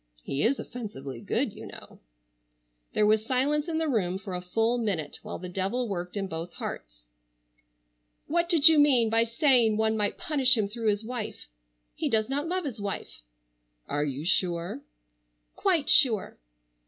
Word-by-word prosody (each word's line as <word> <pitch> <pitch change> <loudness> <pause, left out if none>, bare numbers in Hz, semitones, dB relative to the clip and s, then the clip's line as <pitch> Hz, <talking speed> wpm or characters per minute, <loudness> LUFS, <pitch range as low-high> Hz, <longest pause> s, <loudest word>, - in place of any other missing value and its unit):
He 140 - -3
is 265 +5 +2
offensively 140 - -7
good, - - -1
you - - -10
know." - - -13 0.9
There 210 - +3
was 215 0 +3
silence 275 +6 0
in 325 -2 -2
the 320 0 0
room 190 -9 0
for 190 -1 -8
a 180 - -3
full 225 +6 0
minute 180 -10 -3
while - - -7
the 180 - -8
devil 195 +7 -2
worked 180 -1 -5
in 195 - -2
both 165 -1 -6
hearts. - - -8 1.2
"What 340 +2 0
did 325 -4 +6
you 320 -2 +7
mean 255 -6 +4
by 225 0 +3
saying 230 -2 +3
one 220 0 +1
might 210 -1 -1
punish 265 -5 +3
him 210 -2 +1
through 225 +2 -4
his 205 +1 -1
wife? 235 -2 -6 0.5
He - - -2
does 220 0 +1
not 285 +4 -2
love 365 0 -2
his 240 -7 -5
wife." 195 - -5 0.7
"Are 145 +1 -1
you 145 +1 -4
sure?" 175 - 0 0.7
"Quite 345 -7 +1
sure." 230 - +4
220 Hz, 165 wpm, -27 LUFS, 180-265 Hz, 1.2 s, you